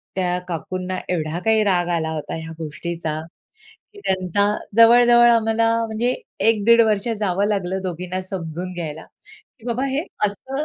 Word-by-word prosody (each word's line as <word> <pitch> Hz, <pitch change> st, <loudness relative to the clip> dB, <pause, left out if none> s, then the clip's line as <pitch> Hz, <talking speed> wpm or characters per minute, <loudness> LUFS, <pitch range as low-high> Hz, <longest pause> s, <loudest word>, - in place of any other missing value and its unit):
त्या 180 Hz, -1 st, 0 dB
काकूंना 185 Hz, +2 st, -4 dB
एवढा 165 Hz, -1 st, -2 dB
काही 220 Hz, -1 st, +4 dB
राग 180 Hz, -4 st, +1 dB
आला 160 Hz, -1 st, -1 dB
होता. 155 Hz, -2 st, -5 dB
ह्या 160 Hz, 0 st, -7 dB
गोष्टीचा 160 Hz, 0 st, -4 dB, 0.8 s
की -, -, -14 dB
त्यांना 190 Hz, +1 st, +1 dB, 0.3 s
जवळ-जवळ 240 Hz, +1 st, +7 dB
आम्हाला 225 Hz, 0 st, +2 dB, 0.2 s
म्हणजे 230 Hz, +3 st, -1 dB, 0.3 s
1 215 Hz, -3 st, +2 dB
दीड 235 Hz, 0 st, +7 dB
वर्ष 210 Hz, +1 st, 0 dB
जावं 200 Hz, 0 st, +1 dB
लागलं 190 Hz, -2 st, -1 dB
दोघींना 180 Hz, +1 st, -4 dB
समजून 180 Hz, -1 st, -5 dB
घ्यायला 160 Hz, -2 st, -6 dB, 0.6 s
की 225 Hz, -, -13 dB
बाबा 245 Hz, +3 st, -1 dB
हे 275 Hz, +4 st, -1 dB, 0.2 s
असं 265 Hz, +8 st, -4 dB
190 Hz, 145 wpm, -21 LUFS, 175-225 Hz, 0.8 s, जवळ-जवळ